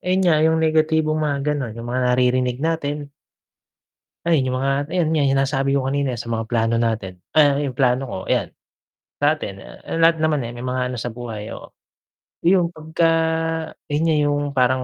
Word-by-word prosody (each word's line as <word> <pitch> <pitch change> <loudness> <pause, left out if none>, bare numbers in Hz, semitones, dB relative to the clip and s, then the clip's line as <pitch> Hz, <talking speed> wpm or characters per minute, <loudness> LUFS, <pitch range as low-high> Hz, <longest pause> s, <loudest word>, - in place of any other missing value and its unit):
ayun 185 +1 +1
nga 155 -3 +4
yung 160 +1 +3
negatibong 155 -1 +2
mga 145 -2 0
ganon, 125 -6 -4
yung 115 - -7
mga 130 - 0 0.2
naririnig 125 0 +2
natin. 145 -3 -2 1.1
Ayan 160 -6 +2
yung 130 - -1
mga 135 +1 0
ayan 165 0 0
nga 155 -2 +2
yung 135 0 +2
nasabi 135 0 0
ko 140 - +2
kanina 140 -2 0
sa 115 0 -6
mga 115 -1 -2
plano 115 0 +1
natin. 110 -6 -2 0.2
Ah, 145 -2 +5
yung 140 -3 -2
plano 130 +1 +1
ko - - -6
ayan, - - 0 0.7
natin, 145 -10 0 0.4
lahat 165 0 +5
naman, 155 -3 +1
eh, 115 - -5
may 120 +1 -7
mga 125 0 -1
ano 125 - -4
sa 120 - -4
buhay, 115 -3 -6
oo, - - -11 0.7
yun 175 0 +4
pagka 160 0 -1 0.8
yun 150 +1 0
nga 165 -1 +2
yung 145 0 +1
parang 130 -1 +2
140 Hz, 180 wpm, -21 LUFS, 125-155 Hz, 1.1 s, Ah